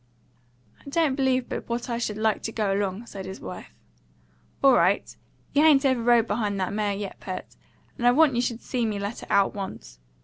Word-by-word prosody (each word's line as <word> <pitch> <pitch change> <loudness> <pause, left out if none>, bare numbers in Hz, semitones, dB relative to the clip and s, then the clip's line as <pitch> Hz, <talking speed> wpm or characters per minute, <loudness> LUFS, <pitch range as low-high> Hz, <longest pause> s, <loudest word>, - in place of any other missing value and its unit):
"I - - -9
don't 310 -1 +2
believe 260 -2 +1
but - - -6
what 235 +1 -2
I 235 -1 -2
should 215 -3 -2
like 220 -1 +1
to 225 - -2
go 210 -3 0
along," 200 +2 -2
said 195 -4 -8
his 190 +1 -7
wife. - - -8 0.9
"All 270 -1 +7
right. 185 0 +2 0.4
You 290 - +4
hain't 300 -3 +5
ever 260 -3 +2
rode 235 -1 +4
behind 205 -2 -1
that 185 +1 -2
mare 205 -1 0
yet, 200 -1 -6
Pert, 185 -1 -7 0.4
and 240 - +2
I - - +7
want 290 0 +4
you 240 - +2
should 240 -1 -3
see 250 -2 -2
me 215 -2 -1
let 200 +3 -4
her - - -10
out 200 -1 +3
once. 190 - -7
225 Hz, 210 wpm, -25 LUFS, 200-250 Hz, 0.9 s, All